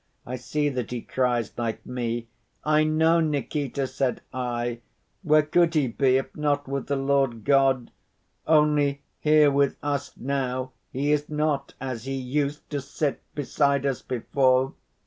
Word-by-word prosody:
I 125 - -4
see 145 +4 -1
that 125 -4 -3
he 125 -1 -4
cries 125 -4 0
like 115 -2 -3
me. 120 -2 -3 0.4
'I 155 0 +3
know, 160 +2 +3
Nikita,' 145 -2 -1
said 130 -1 -1
I. 120 -1 -2 0.4
'Where 155 -4 +4
could 170 +2 +2
he 145 -5 +2
be 130 +2 +3
if 135 - -4
not 145 -1 0
with 140 0 -3
the 140 - 0
Lord 135 -4 +1
God? 135 -3 +3 0.6
Only, 150 -2 +3 0.2
here 150 -1 +5
with 140 0 +2
us 145 -1 -2
now 130 -1 -2 0.2
he 140 +3 0
is 150 0 +1
not 150 -2 -1
as 130 -3 -5
he 135 0 -2
used 140 +3 -2
to 145 -1 -2
sit 140 +1 -2
beside 140 -1 +1
us 135 -3 -1
before. 130 +1 +1
140 Hz, 150 wpm, -25 LUFS, 130-150 Hz, 0.6 s, here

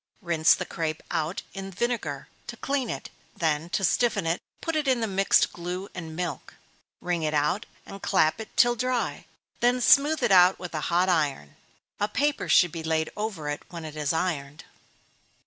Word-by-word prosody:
Rinse 170 -4 +4
the - - -4
crape 160 -2 -3
out 165 +2 -2
in 195 -1 -6
vinegar 195 - -3 0.2
to 235 - -7
clean 270 -4 -1
it; - - -5 0.3
then, 160 0 0
to 195 - -1
stiffen 230 0 +2
it, 165 +2 0 0.2
put 330 -1 -3
it 300 -2 0
in 260 -2 +3
the 225 - 0
mixed 195 -1 +3
glue 180 +3 -5
and 165 -3 -7
milk. 175 -1 -5 0.5
Wring 175 -1 -1
it 155 -1 -1
out, 150 +7 0 0.2
and 195 - -10
clap 185 0 +2
it 220 - -8
till 240 0 +5
dry, 250 0 -2 0.3
then 245 +1 +3
smooth 290 +5 +4
it - - +2
out 185 0 +7
with 180 -2 -8
a 155 - -2
hot 175 +2 +3
iron 145 - 0 0.4
a 205 - +1
paper 290 +6 -1
should 175 -2 +5
be 165 - -5
laid 160 0 -1
over 210 -8 -4
it 145 0 -3
when 170 -2 -7
it 155 -1 -8
is 150 -2 -1
ironed. 155 -4 -2
180 Hz, 185 wpm, -26 LUFS, 160-220 Hz, 0.5 s, out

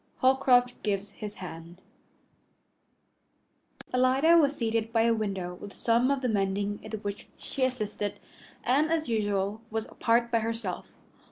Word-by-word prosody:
Holcroft 255 -1 +4
Gives 200 -1 -2
His 210 0 -7
Hand 170 -1 -9 2.1
Alida 260 +6 +4
was 290 -3 +4
seated 225 -2 -1
by 225 -1 +3
a 230 0 +4
window 195 -5 -2
with 200 +3 -10
some 235 +2 +2
of 280 -1 +1
the 255 - 0
mending 200 -1 0
in - - -9
which 205 0 -5
she 270 - -4
assisted, 215 -5 -3 0.5
and, 290 +6 +2
as 320 -3 0
usual, 205 -1 0
was 220 0 -2
apart 235 0 +1
by 230 - +3
herself. 225 -4 -3
225 Hz, 140 wpm, -28 LUFS, 205-250 Hz, 2.1 s, Holcroft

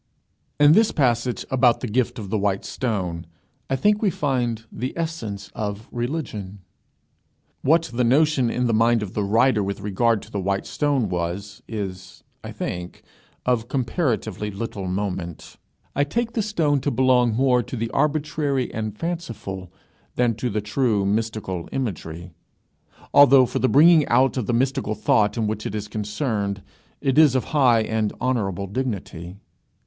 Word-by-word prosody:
In 145 0 +7
this 220 +6 +5
passage 125 -4 0
about 125 -2 +3
the 125 - -2
gift 120 +2 0
of 100 -4 -7
the 110 - +1
white 100 -1 0
stone, 90 -9 -3 0.4
I 135 - +1
think 210 +10 +2
we 210 - +3
find 120 - -1
the 125 +7 -5
essence 160 -12 -4
of 105 0 -4
religion. 120 -7 -4 1.0
What 160 +4 +4
the 125 +1 +1
notion 135 0 +3
in 125 +2 -1
the 115 - +1
mind 115 0 +3
of 100 - -7
the 105 - -1
writer 110 +3 +3
with 100 0 -3
regard 105 +2 +1
to - - -15
the 100 - -2
white 95 +1 -1
stone 140 -6 0
was, 90 +3 -4
is, 95 -4 -6 0.2
I - - -7
think, 90 0 -6 0.4
of 120 -2 +1
comparatively 125 - -1
little 100 -1 -5
moment. 90 -3 -4 0.4
I 145 - +3
take 230 +10 -1
the 230 - -1
stone 165 -9 +1
to 140 - -1
belong 125 -2 +3
more 125 0 +3
to 120 - -7
the 115 0 -3
arbitrary 145 -2 0
and 110 -1 -4
fanciful 115 - -5 0.4
than 120 -1 +2
to 125 +1 -2
the 105 -1 -1
true 105 -1 0
mystical 105 -4 -2
imagery, 90 -9 -4 0.8
although 135 -2 +7
for 125 - -3
the 130 - +2
bringing 160 +1 +6
out 135 0 +3
of 125 -6 -2
the - - +1
mystical 130 -2 0
thought 105 0 +2
in 115 - 0
which 105 0 -2
it 105 - -5
is 105 -1 -4
concerned, 105 -2 -2 0.4
it 135 0 +2
is 150 -5 +6
of 130 - +2
high 125 -6 +4
and 110 -1 -1
honourable 100 -7 -1
dignity. 100 -6 -4
115 Hz, 160 wpm, -23 LUFS, 100-135 Hz, 1.0 s, In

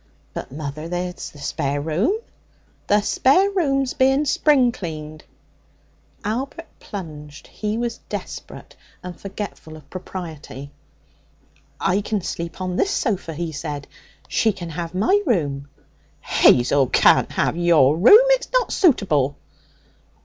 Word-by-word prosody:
'But, - - -6
mother, 150 +2 -6
there's 180 0 -4
the - - -17
spare 140 0 -2
room.' 170 - 0 0.7
'The 205 +1 +4
spare 360 - +3
room's 275 -8 0
being 270 +3 +3
spring 270 -3 +3
cleaned.' 155 -7 -7 1.0
Albert 265 +10 -3
plunged; 150 -7 -9
he 215 0 -4
was 235 -1 -3
desperate - - -7 0.3
and 180 -1 -7
forgetful 195 -4 -7
of 150 -3 -17
propriety. 160 -7 -8 1.1
'I 190 +3 +1
can 210 0 -2
sleep 170 -1 -5
on 185 0 -2
this 395 - +2
sofa,' 200 - -1
he 170 +1 -3
said. 145 -2 -5 0.4
'She 220 -2 +2
can 175 -3 -7
have 170 +2 -5
my 375 - +3
room.' 145 - 0 0.5
'Hazel 130 +2 +4
can't - - +4
have - - 0
your 165 -5 +4
room. 410 - +8
It's - - +2
not - - +1
suitable.' 155 - +2
180 Hz, 125 wpm, -22 LUFS, 150-240 Hz, 1.1 s, room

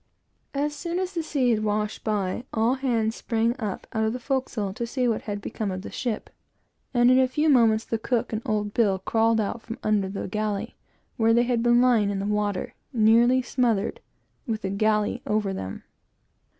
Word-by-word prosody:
As 295 +1 0
soon 340 +3 -3
as 370 +1 -2
the 335 - -1
sea 275 -6 +1
had 215 -2 +1
washed 210 0 -1
by, 210 0 -1
all 225 +3 +2
hands 235 -4 0
sprung 230 0 0
out 210 -5 -4
of 220 0 0
the 250 - -4
forecastle 245 -6 -2
to 235 +2 -4
see 250 +1 0
what 225 -2 0
had 205 0 -3
become 215 0 -3
of 185 0 -4
the - - -7
ship 235 -4 -3 0.6
and 240 -1 +4
in 255 - +5
a 260 - +4
few 300 +5 +1
moments 225 -5 +4
the 225 - -2
cook 235 0 -1
and 220 - -1
old 210 -1 -1
Bill 205 -5 +2
crawled 225 +4 +2
out 220 +2 -2
from 230 +2 -7
under 205 -3 +1
the 195 - -4
galley, 210 +2 -2 0.4
where 225 0 +4
they 240 - +4
had 240 -1 0
been 240 0 +4
lying 235 -5 +4
in 200 - -2
the 195 - -2
water, 205 -2 -1 0.2
nearly 240 +2 +4
smothered, 245 - 0 0.5
with 220 -2 -2
the 190 - -2
galley 210 +1 +1
over 210 -2 0
them. 95 - -6
225 Hz, 195 wpm, -25 LUFS, 210-245 Hz, 0.6 s, in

